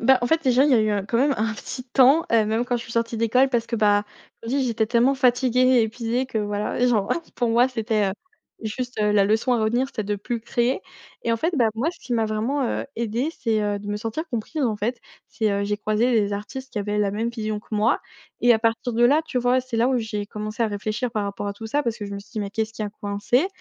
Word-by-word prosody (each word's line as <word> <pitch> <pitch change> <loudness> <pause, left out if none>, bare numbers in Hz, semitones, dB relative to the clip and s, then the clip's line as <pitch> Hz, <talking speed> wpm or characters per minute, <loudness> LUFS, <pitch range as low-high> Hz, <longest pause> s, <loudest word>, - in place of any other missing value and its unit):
bah 265 +3 +5
en - - +2
fait, 320 +5 +2
déjà, 260 +1 +4
il 295 - +3
y - - +6
a 230 - +5
eu 215 0 +1
un 200 -2 -1
quand 220 +3 -1
même 280 +2 +3
un 220 +1 -1
petit 255 +4 -7
temps, 270 +5 +5
heu, 225 -2 +5
même 220 +3 0
quand 245 0 0
je 235 - -5
suis 230 - -10
sortie 230 0 -1
d'école 230 +4 +3
parce 240 -3 0
que, 235 - -2
bah, 205 -1 +3 0.4
comme 230 - -5
je 275 - +1
dis, 270 - +1
j'étais 225 -2 0
tellement 240 +4 +3
fatiguée 255 -1 +2
et 255 -2 +5
épuisée 230 +3 -1
que 225 - -2
voilà, 205 0 -2
genre 215 -5 +2 0.2
pour 240 - 0
moi 235 +2 +4
c'était, 220 -4 0
heu, - - -3 0.5
juste, 245 +2 -4
heu, 210 0 +3
la 205 -1 +4
leçon 220 +5 +2
à - - +1
retenir 240 +4 +1
c'était 240 -6 -4
de 205 +1 -1
plus 230 +4 -4
créer. 240 - 0 0.4
Et 230 - 0
en - - +2
fait, 325 +10 -1
bah, 235 - +4
moi 240 +8 0
ce 345 - -16
qui 250 - -6
m'a 225 -2 +2
vraiment, 225 +7 -1
heu, - - -2
aidée 235 +6 -1
c'est, 225 -3 +1
heu, 205 -1 -1
de 205 - -10
me 205 - -1
sentir 225 +9 -4
comprise, 250 +6 -3
en 225 -5 +1
fait. 235 +4 -2 0.3
C'est 220 -2 0
heu 200 0 0
j'ai 205 0 -1
croisé 215 +4 +1
des 205 -3 +2
artistes 260 +7 -6
qui 215 - -3
avaient 205 +1 -1
la 205 -1 +2
même 220 +4 -2
vision 215 -2 -3
que - - -27
moi 215 +2 +2 0.4
et 245 - +7
à 225 - +3
partir 230 +2 0
de 235 +1 +3
là, 285 +6 +5
tu 260 - -1
vois, 245 +1 +2
c'est 255 -2 -5
là 235 +2 +3
où 265 - +2
j'ai 215 -3 -3
commencé 215 +2 -4
à - - +3
réfléchir 215 +4 -3
par 210 -2 -2
rapport 200 0 -4
à - - -2
tout 220 +2 -8
ça. 290 +7 0
Parce 235 -4 -2
que 205 - -5
je 200 - -6
me - - -4
suis 200 - -18
dit: 220 - -3
«Mais 200 -1 -4
qu'est-ce 220 +1 -2
qui 225 - -5
a 210 - -2
coincé?». 205 - 0
230 Hz, 280 wpm, -23 LUFS, 210-250 Hz, 0.5 s, et